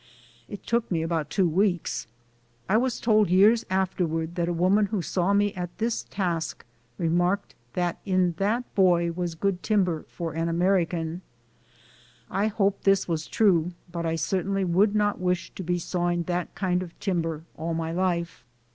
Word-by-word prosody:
It 205 - -8
took 235 0 0
me 165 -3 0
about 165 -3 -1
two 185 +3 +2
weeks. 175 - 0 0.6
I 195 - +2
was 250 +1 +1
told 215 -4 +3
years 210 +6 +5
afterward 175 -3 -1
that 175 -1 -1
a - - +1
woman 185 +5 +3
who 200 -4 -2
saw 180 +3 0
me 205 0 +2
at 175 -1 -6
this 225 +2 -1
task 175 -5 -2 0.3
remarked 175 +4 0 0.2
that 175 -1 -1
in 185 -3 +2
that 215 +5 +1
boy 175 -3 +3
was 170 -1 -3
good 185 +1 -1
timber 185 -7 +1
for 165 -3 -5
an 165 +1 -1
American. 170 -1 0 1.1
I 195 +3 +1
hope 200 -2 0
this 195 0 +3
was 160 -2 -2
true, 180 -5 +2 0.2
but 170 -1 -3
I 165 - 0
certainly 190 +3 0
would 195 +4 +3
not 205 -1 +1
wish 180 -1 -1
to - - -8
be 175 0 0
sawing 175 0 -1
that 175 +1 -3
kind 180 -2 0
of 175 -2 -9
timber 165 -5 -2
all 165 +1 -3
my 165 0 -2
life. 170 -6 -1
180 Hz, 165 wpm, -26 LUFS, 170-195 Hz, 1.1 s, years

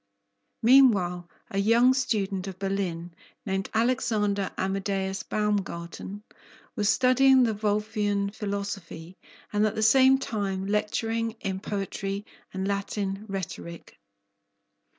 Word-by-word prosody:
Meanwhile 200 -9 +4 0.2
a 195 - -1
young 230 +5 +5
student 200 -7 -1
of 190 -2 -7
Berlin, 185 -3 -3 0.3
named 195 -1 -2
Alexander 220 -4 +1
Amedeus 195 0 -2
Baumgarten, 200 -1 -3 0.5
was 210 -3 +1
studying 260 +1 +5
the 225 -2 +2
Wolffian 210 -1 -1
philosophy, 200 -5 -5 0.4
and 210 0 +2
at 215 - -3
the 220 - 0
same 265 +4 +6
time 200 -7 -3
lecturing 225 +2 -1
in 190 -1 -3
poetry 195 0 -4 0.3
and 190 0 -3
Latin 200 0 -3
rhetoric. 185 -3 -7
200 Hz, 105 wpm, -27 LUFS, 195-220 Hz, 0.5 s, same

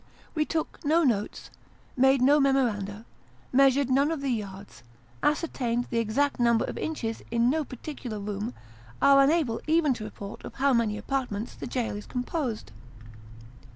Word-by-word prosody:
We 310 -2 +1
took 320 0 -3
no 320 +3 +3
notes, 215 -7 -1 0.4
made 265 0 +4
no 290 +3 +6
memoranda, 230 -7 +1 0.5
measured 270 0 +4
none 280 +3 +3
of 320 -3 -2
the 275 -2 -1
yards, 200 - -6 0.4
ascertained 250 -6 0
the 230 - +1
exact 255 +6 0
number 235 -1 +3
of - - -5
inches 230 -8 -3
in 235 +2 +2
no 315 +1 0
particular 255 -4 -7
room: 205 +3 -4 0.4
are 275 0 +6
unable 275 -5 +2
even 310 -3 +3
to 235 - -7
report 205 -1 -8
of - - -9
how 275 +1 +2
many 225 -3 +1
apartments 245 -5 -3
the - - -7
jail 240 -4 -2
is 205 - -8
composed. 250 - -3
250 Hz, 155 wpm, -27 LUFS, 220-280 Hz, 0.5 s, no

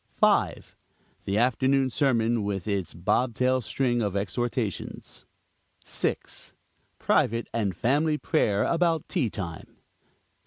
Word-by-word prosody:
5. - - +1 0.5
The 100 +1 0
afternoon 130 +3 +2
sermon 115 -4 +2
with 100 -1 -3
its 95 -5 -1
bob 115 +7 0
tail 130 +1 +2
string 120 +1 0
of 100 -3 -1
exhortations. 105 +2 -3 0.6
6. - - -3 0.4
Private 115 +1 +1
and 105 -6 -1
family 150 - +2
prayer 105 -11 +1
about 165 -2 +1
tea 145 - 0
time. 85 -5 -7
115 Hz, 110 wpm, -27 LUFS, 100-130 Hz, 0.6 s, afternoon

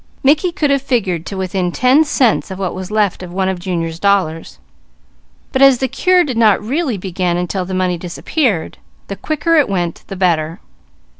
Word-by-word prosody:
Mickey 305 +6 +3
could 300 -3 0
have 275 -1 +2
figured 195 - -1
to 195 - -5
within 185 -1 -2
ten 255 - +4
cents 265 -9 +1
of 190 - -6
what 190 -2 -3
was 185 0 -6
left 210 -3 0
of 180 -1 -8
one 190 +1 -1
of 190 -2 -2
Junior's 170 -3 -3
dollars; 185 -5 0 0.9
but 265 - 0
as 275 -2 +7
the 265 - -1
cure 365 +7 +2
did 260 -7 -4
not 220 -3 +4
really 260 +1 -2
begin 180 -2 -2
until 180 +1 -2
the 190 +1 -4
money 180 -2 0
disappeared, 185 - -2 0.3
the 200 - -4
quicker 310 - 0
it 295 - +3
went 175 -4 -2
the 195 - -6
better. 170 -3 0
195 Hz, 190 wpm, -16 LUFS, 180-265 Hz, 0.9 s, as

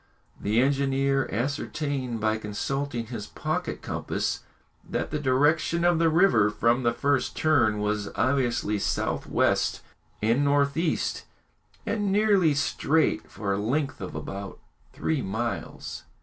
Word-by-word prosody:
The 105 +3 +2
engineer 135 0 +2
ascertained 135 +1 -2
by 110 0 +1
consulting 120 +4 -3
his 115 -3 -6
pocket - - -3
compass - - -2 0.4
that - - -3
the 150 - -1
direction 150 +5 +2
of 175 -2 +4
the 165 -1 +4
river 155 - +4
from 115 +4 +2
the 120 -1 +2
first 140 +2 0
turn 130 -9 +3
was 105 -1 -1
obviously 120 -5 +1
south - - -1
west - - +1 0.4
and 115 +6 +2
north 140 0 +2
east, 165 0 -1 0.6
and 205 -3 0
nearly 200 -7 +4
straight 155 +2 +1
for 100 -2 -2
a 100 - -1
length 140 +6 -1
of - - -6
about 100 0 -6 0.3
three 155 -4 -1
miles. 115 +4 -4
135 Hz, 130 wpm, -26 LUFS, 110-150 Hz, 0.6 s, of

